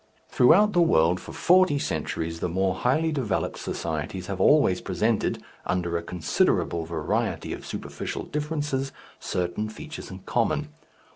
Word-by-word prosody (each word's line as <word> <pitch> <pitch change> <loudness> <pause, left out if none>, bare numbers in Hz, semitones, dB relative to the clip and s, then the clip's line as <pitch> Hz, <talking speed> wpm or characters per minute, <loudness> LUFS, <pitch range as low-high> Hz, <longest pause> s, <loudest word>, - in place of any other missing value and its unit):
Throughout 205 +12 +5
the 175 - +4
world 90 - +4
for - - -10
forty 180 -4 +4
centuries 80 -10 -3
the 90 - -1
more 95 +2 +1
highly 155 - +1
developed 125 -10 -1
societies 80 +3 -4
have 95 -1 -4
always 120 -8 +4
presented 105 +4 0 0.2
under 85 -2 -1
a 85 - 0
considerable 85 -1 0
variety 80 -2 -2
of - - -8
superficial - - -5
differences 150 -3 -2 0.3
certain 90 +4 -2
features 155 +8 -8
in 95 - -7
common. - - 0
95 Hz, 135 wpm, -26 LUFS, -, 0.3 s, Throughout